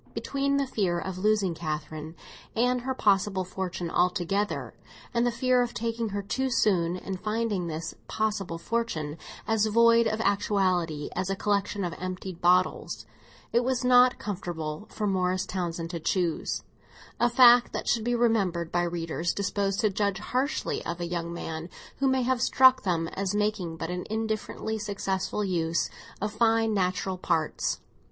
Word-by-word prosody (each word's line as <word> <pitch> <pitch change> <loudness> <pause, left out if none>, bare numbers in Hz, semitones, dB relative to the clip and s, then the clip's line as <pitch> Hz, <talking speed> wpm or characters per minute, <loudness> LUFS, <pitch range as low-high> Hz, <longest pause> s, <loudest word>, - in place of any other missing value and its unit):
Between 280 0 0
the 280 - +1
fear 195 -9 0
of 185 +1 -4
losing 205 -3 +2
Catherine 155 0 -5 0.4
and 250 +2 +2
her 260 +1 -2
possible 195 -3 +2
fortune 180 -2 -4
altogether, 180 +3 0 0.4
and 235 0 +2
the - - +2
fear 250 +1 +2
of 240 -2 -2
taking 230 +1 -2
her 200 0 -3
too 265 +6 -1
soon 180 -7 +2
and 190 0 -5
finding 215 -4 -1
this 165 +1 -4
possible 210 -6 -1
fortune 165 -7 -2 0.3
as 220 -1 +2
void 230 +1 +5
of 220 0 -1
actuality 185 -7 +1
as 190 - -1
a 195 - 0
collection 205 0 0
of 175 -2 -2
emptied 185 -1 -5
bottles, 180 +1 +2 0.5
it 240 +1 +4
was 255 0 0
not 250 0 +6
comfortable 175 -3 -5
for 215 - -3
Morris 185 -1 +1
Townsend 170 -3 -3
to 170 - -4
choose; 170 0 -1 0.6
a 240 - +4
fact 245 0 +7
that - - -4
should 230 - +2
be 240 +1 +1
remembered 195 -8 +1
by 175 - +2
readers 170 -1 -1
disposed 200 0 0
to 215 -3 +2
judge 200 0 0
harshly 255 +8 -1
of 170 0 -4
a 175 - -2
young 170 -1 -3
man 165 0 -5 0.3
who 275 - +1
may 260 -1 +2
have 255 0 +1
struck 260 +1 +6
them 170 -3 0
as 195 +1 -2
making 210 -6 -1
but 165 +1 -4
an 180 0 -4
indifferently 220 0 -2
successful 200 -1 -2
use 170 -3 0 0.3
of 210 +1 -2
fine 225 0 +3
natural 185 -1 0
parts. 160 -3 -1
195 Hz, 160 wpm, -27 LUFS, 175-225 Hz, 0.6 s, fact